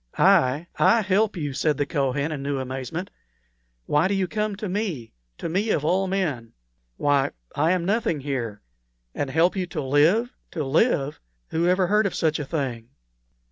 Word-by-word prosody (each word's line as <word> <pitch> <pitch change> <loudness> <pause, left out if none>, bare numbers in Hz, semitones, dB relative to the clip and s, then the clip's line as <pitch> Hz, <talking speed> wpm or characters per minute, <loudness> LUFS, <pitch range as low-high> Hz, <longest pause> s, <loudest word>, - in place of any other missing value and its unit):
"I 130 +6 +4
I 230 0 +5
help 205 +1 +1
you!" 145 -4 -3
said 150 +1 +1
the 145 - +1
Kohen, 140 0 -1
in 145 -3 -4
new 140 0 -2
amazement. 130 +7 -5 0.7
"Why 150 +4 +2
do 200 - 0
you 190 -1 0
come 210 +1 -2
to 210 +1 -5
me 180 - -3 0.2
to - - -4
me, 195 +7 0
of 150 -7 +1
all 190 +4 +2
men? 155 -12 -2 0.4
Why, 140 -2 +2 0.3
I 155 +4 +2
am 180 -2 -1
nothing 205 -6 0
here. 120 - -4 0.5
And 140 - -2
help 165 +7 +3
you 185 -2 -2
to 175 -2 -5
live 165 - +3 0.2
to 155 -5 -2
live! 145 - +1 0.3
Who 165 +2 0
ever 185 +1 +3
heard 210 +2 +3
of 190 - -5
such 160 -1 +1
a 150 - -3
thing?" 130 -7 -3
160 Hz, 180 wpm, -24 LUFS, 140-190 Hz, 0.7 s, I